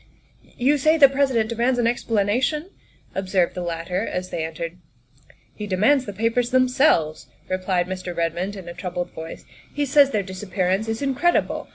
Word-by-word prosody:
" - - -31
You 280 +4 +2
say 310 +4 +4
the 285 -3 +9
President 265 -5 +1
demands 240 +2 0
an 240 - +1
explanation?" 240 - 0 0.4
observed 190 -2 0
the 180 - -5
latter 170 +1 -3
as 185 -4 -4
they 160 - -2
entered. 165 +2 -5 0.4
" 140 - -29
He 210 - -6
demands 220 +8 +3
the 205 - -5
papers 230 +4 0
themselves," 250 - +2 0.2
replied 185 -1 0
Mr. 185 -1 -6
Redmond 170 +4 -1
in 190 -3 -9
a 170 - -6
troubled 180 0 -4
voice; 160 0 -9 0.3
"he 290 0 -1
says 280 0 +5
their 210 -7 0
disap 190 +1 -9
pearance 190 +3 +1
is 225 +4 -2
incredible. 280 +6 +1
205 Hz, 175 wpm, -23 LUFS, 180-255 Hz, 0.4 s, the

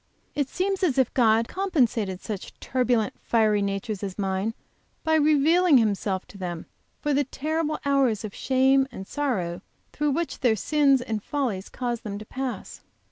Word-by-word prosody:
It 285 -2 -1
seems 385 +1 -1
as 320 -9 +1
if 260 -3 +2
God 225 -4 +5
had 230 +1 0
compensated 240 - 0
such 205 -4 -7
turbulent, 245 -4 +1
fiery 215 -3 +2
natures 200 +1 -2
as 195 -3 -5
mine, 195 +2 -1 0.5
by 320 - +1
revealing 310 +2 +5
Himself 200 -4 0
to 200 - -12
them, 175 -3 -5 0.3
for 295 -1 0
the 285 +1 +3
terrible 310 +3 -2
hours 270 -7 +2
of 205 - -7
shame 265 +1 +3
and 190 - -7
sorrow 185 -12 -2 0.3
through 295 0 0
which 330 +4 -2
their 240 -4 +3
sins 275 +2 +3
and 220 -3 -3
follies 230 -8 -2
cause 240 -2 -3
them 205 -2 -5
to 215 - -9
pass. 260 +1 -5
245 Hz, 165 wpm, -25 LUFS, 205-290 Hz, 0.5 s, God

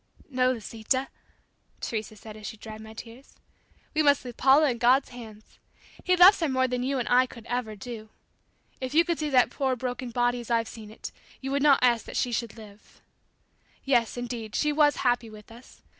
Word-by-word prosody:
"No, 255 0 +2
Lisita," 240 +3 -2 0.7
Teresa 220 -1 -4
said 215 +1 -11
as 215 -1 -8
she 220 - -8
dried 215 0 -10
my 220 0 -11
tears; 235 +4 -12 0.6
"We 310 - +2
must 285 -2 +3
leave 245 -2 -7
Paula 275 +2 +5
in 235 - -5
God's 255 +3 +3
hands. 220 -3 -13 0.4
He 365 - +3
loves 365 +3 +8
her 325 -3 0
more 260 0 +1
than 250 0 -2
you 270 +2 -1
and 245 - -2
I 255 +1 +4
could 235 -2 -13
ever 245 -3 -3
do. 220 +1 -9 0.7
If 260 +2 -5
you 335 +1 +5
could 340 -1 -1
see 305 -1 -2
that 255 -3 +4
poor 265 -2 -1
broken 250 0 -4
body 245 +1 0
as 240 - -9
I've 230 -1 +1
seen 215 -2 -10
it 220 - -9 0.3
you 270 0 -5
would 280 +1 0
not 285 -1 +6
ask 240 -2 +3
that - - -6
she 245 - 0
should 235 -1 -3
live! 210 -1 -15 0.8
Yes, 245 -4 +1
indeed, 235 -3 -5
she 300 0 +1
was 295 -1 +4
happy 245 -2 +1
with 215 0 -14
us. 240 +3 -16
245 Hz, 205 wpm, -27 LUFS, 225-270 Hz, 0.8 s, loves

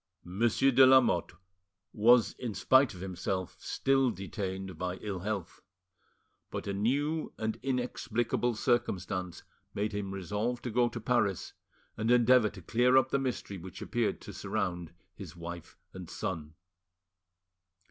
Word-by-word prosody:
Monsieur 115 +8 +2
de 130 +1 +7
Lamotte 130 -11 +5 0.6
was, 115 +2 +5
in 115 -5 -4
spite 130 +4 +4
of 90 - -10
himself, 95 0 -3
still 135 -1 +1
detained 95 -2 -5
by 90 +2 -3
ill 100 -1 -5
health. 95 -2 -4 0.9
But - - -5
a 100 - -2
new 145 +10 0
and 110 0 -3
inexplicable 120 -2 -1
circumstance 95 -7 -1 0.3
made 105 +2 -1
him 100 -1 -4
resolve 105 +6 -2
to 120 - -3
go 120 +1 +3
to 120 - -6
Paris 110 -5 0 0.4
and 110 +1 -1
endeavour 120 -2 +5
to 95 -3 -12
clear 125 +7 +3
up 130 0 +3
the 140 - +2
mystery 125 -7 -3
which 95 +3 -9
appeared 115 +1 -1
to - - -9
surround 90 -5 -3 0.2
his 95 -4 -10
wife 85 0 -8 0.2
and 90 -3 -9
son. 80 -5 -5
105 Hz, 135 wpm, -30 LUFS, 95-125 Hz, 0.9 s, de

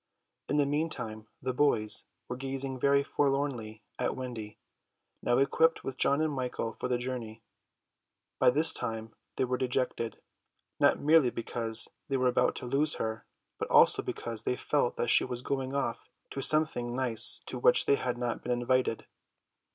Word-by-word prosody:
In 145 - 0
the 145 -1 +3
meantime 140 -8 -3 0.2
the 130 0 -1
boys 125 -6 +2 0.2
were 125 - -4
gazing 135 0 -4
very 140 +1 +3
forlornly 135 -7 -1 0.2
at - - -1
Wendy, 120 -5 -7 0.6
now 120 - +1
equipped 160 +4 +2
with 135 - -5
John 140 +3 +2
and 155 -1 0
Michael 125 -4 -3
for - - -4
the 125 -1 0
journey. 120 -3 -6 1.0
By - - +6
this 155 +5 +3
time 110 0 -4 0.2
they - - +1
were 125 0 -2
dejected, 125 -3 -2 0.6
not - - +4
merely 150 -3 +4
because 115 -1 0 0.2
they 135 - +1
were 130 -1 +2
about 125 - +1
to - - -6
lose 140 +5 +1
her, 110 0 -4 0.3
but - - -3
also - - +5
because 115 -2 -4
they - - -1
felt 140 -1 0
that 120 - 0
she - - +6
was 125 -1 -5
going 135 0 -3
off 120 -4 -3 0.2
to 135 - -4
something 135 -5 +2
nice 120 -3 +3
to 125 - -6
which 125 - +5
they - - +4
had 125 -3 -1
not 120 -1 -3
been 125 - -4
invited. 120 -1 0
125 Hz, 165 wpm, -30 LUFS, 120-140 Hz, 1.0 s, By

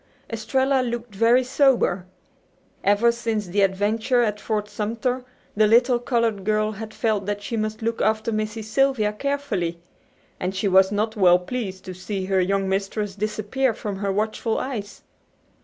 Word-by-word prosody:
Estralla 265 +4 +1
looked 240 -2 -4
very 230 +5 +4
sober. 250 -9 +2 0.8
Ever 205 +4 +4
since 230 -3 -2
the 195 +3 0
adventure 215 +6 +2
at 210 -2 -1
Fort 210 -1 -2
Sumter 230 +5 -2 0.3
the 215 0 +4
little 240 +2 +4
colored 230 -5 0
girl 215 +1 +1
had 215 +1 -7
felt 215 -4 -1
that 205 0 -3
she 230 - -3
must 215 0 -3
look 230 0 -1
after 220 +1 +1
Missy 215 0 -2
Sylvia 220 -1 +1
carefully. 210 -9 -2 0.6
And 185 +1 -2
she 195 +2 0
was 190 0 +5
not 215 +2 -1
well 180 -4 +6
pleased 190 -1 -5
to 185 - -6
see 185 +1 -4
her 190 0 +2
young 195 +1 0
mistress 195 +1 -2
disappear 215 +4 -1
from 205 -3 -5
her 200 0 -1
watchful 215 +2 -1
eyes. 215 -6 -5
215 Hz, 155 wpm, -23 LUFS, 200-235 Hz, 0.8 s, well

